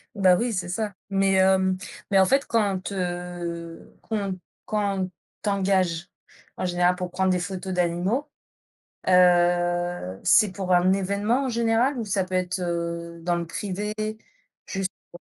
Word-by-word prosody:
Ben 190 -3 +5
oui, 240 +3 0
c'est 180 -3 -2
ça. 205 +3 -2 0.2
Mais, 195 0 +2
hem, 190 0 +3 0.3
mais 195 -2 +4
en 190 - +6
fait 275 +7 +2
quand, 200 -4 0
heu, 175 -2 -5
qu'on 200 -4 -3 0.3
quand 200 -3 -1 0.3
t'engage, 190 -4 +1 0.5
en - - -2
général 180 0 +2
pour 180 -1 -5
prendre 190 +1 +1
des 180 -1 +2
photos 185 +1 -4
d'animaux, 180 +10 0 0.8
heu, 175 - +3
c'est 210 -4 +5
pour 190 -2 -1
un 180 +1 +4
événement 200 +7 0
en - - -1
général 235 +3 +2
ou 230 - -3
ça 195 -2 0
peut 185 0 -4
être, 180 0 -1
heu, 170 -1 -3
dans 175 +1 0
le 170 0 -2
privé? 205 +4 -4 0.7
Juste 190 -1 -2 0.2
pour 175 - -11
185 Hz, 150 wpm, -25 LUFS, 175-200 Hz, 0.8 s, en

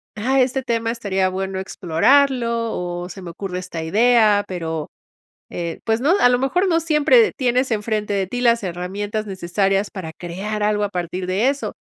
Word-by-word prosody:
ah, 260 +5 +1
este 260 +1 0
tema 230 -2 -1
estaría 195 -5 0
bueno 190 0 -3
explorarlo" 235 - +1
o, 175 0 -4
"se 190 - -9
me 180 - -8
ocurre 180 +1 -5
esta 170 -3 -6
idea", 215 +2 +4
pero 160 -4 -4 0.6
eh, 170 -1 -5
pues 225 0 +1
no, 290 +7 +3
a 245 - +5
lo 245 0 +2
mejor 355 +9 +1
no 335 -3 +2
siempre 330 +9 +4
tienes 255 0 +1
enfrente 210 -1 -1
de 195 -1 0
ti 245 +6 -4
las 235 -3 +3
herramientas 200 +4 -4
necesarias 195 +1 0
para 185 -6 -6
crear 200 +6 -4
algo 210 0 +1
a 205 - +1
partir 180 0 -4
de 200 +8 +2
eso. 280 +1 -2
210 Hz, 175 wpm, -21 LUFS, 185-245 Hz, 0.6 s, a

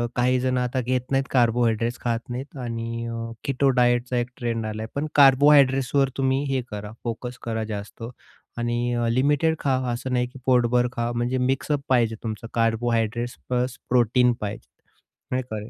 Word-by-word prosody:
काही 125 +1 +2
जणं 130 0 0
आता 125 +1 -1
घेत 125 +1 0
नाहीत 135 0 +2
कार्बोहाइड्रेट्स 120 -1 +2
खात 115 -1 -1
नाहीत 130 +4 -6
आणि 115 -1 -4
अ, 115 0 -5
कीटो 140 0 +1
डायटचा 120 0 +2
1 120 0 0
ट्रेंड 115 -3 -2
आलाय 110 0 -4
पण 145 +2 -1
कार्बोहाइड्रेट्सवर 135 -1 +5
तुम्ही 135 0 +1
हे 130 - +1
करा 105 0 -6
फोकस 120 +2 -4
करा 110 -1 -2
जास्त 105 +2 -7 0.5
आणि 120 +1 -1
अ, 120 -1 0
लिमिटेड 145 +6 +2
खा, 135 -2 +1 0.2
असं 130 +2 -4
नाही 125 0 +1
की 130 +2 -13
पोटभर 125 -1 +3
खा. 120 0 -2
म्हणजे 120 +2 0
मिक्सअप 135 +3 0
पाहिजे 120 -3 +3
तुमचं 110 0 -5
कार्बोहायड्रेट्स 115 +1 0
प्लस 125 0 -1
प्रोटीन 125 0 +3
पाहिजे 105 0 -5 0.7
नाही 130 0 +1
का 110 - -3
120 Hz, 160 wpm, -24 LUFS, 115-130 Hz, 0.7 s, कार्बोहाइड्रेट्सवर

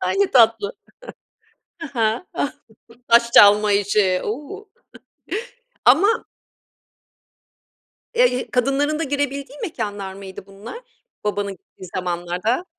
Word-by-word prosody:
Ay, - - -1
ne 400 0 +3
tatlı. 225 -4 +4 1.1
He 330 - -7
he. 220 +8 +1 0.8
Taş 235 0 +4
çalma 205 0 +7
işi. 200 -2 +2
U! 300 - -6 1.2
Ama 390 - +4 1.9
Eee, 475 - +2
kadınların 280 +5 +1
da - - 0
girebildiği 280 0 -3
mekânlar 205 - -4
mıydı 190 -1 -10
bunlar 200 - -10 0.4
babanın 205 -1 -2
gittiği 185 0 -14
zamanlarda? 180 - -2
225 Hz, 95 wpm, -21 LUFS, 200-285 Hz, 1.9 s, çalma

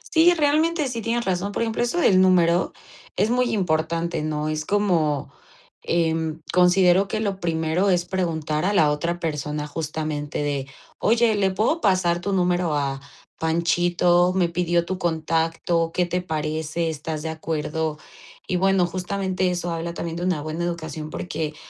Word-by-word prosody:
Sí, 330 +2 +7
realmente 310 0 +2
sí 235 -2 -4
tienes 235 +2 -1
razón. 190 +2 -1
Por 215 - -1
ejemplo, 225 0 -2
eso 240 +7 0
del 190 - +5
número 180 -1 +3 0.4
es 210 +4 +1
muy 250 0 +2
importante, 170 -3 0
¿no? 155 0 -2
es 155 0 -2
como, 165 -7 0 0.5
em, 160 -1 0
considero 180 +1 +4
que 215 - -2
lo 200 -3 -2
primero 165 +3 0
es 175 -2 +2
preguntar 160 -4 -2
a 200 +3 +1
la 155 -6 +4
otra 170 +4 -2
persona 150 -2 -3
justamente 150 -1 -3
de: 140 -2 -2 0.3
"oye, 230 0 +3
¿le 200 -2 +2
puedo 220 - 0
pasar 180 -3 +2
tu 200 - -2
número 180 -3 +1
a 135 -2 -2 0.4
Panchito? 175 +2 +2
me 180 -2 +2
pidió 170 0 0
tu 185 +1 -4
contacto, 165 0 0
¿qué 180 +1 +1
te 180 +1 -2
parece? 160 0 -2
¿estás 155 0 -5
de 160 - -3
acuerdo?" 160 -1 -3 0.5
y 185 - 0
bueno, 190 0 +3
justamente 185 +1 -1
eso 175 -1 -2
habla 170 +1 -4
también 165 -1 -4
de 175 - -4
una 180 -5 0
buena 155 +2 -4
educación, 160 -2 -4
porque 155 -2 -4
170 Hz, 160 wpm, -23 LUFS, 160-190 Hz, 0.5 s, Sí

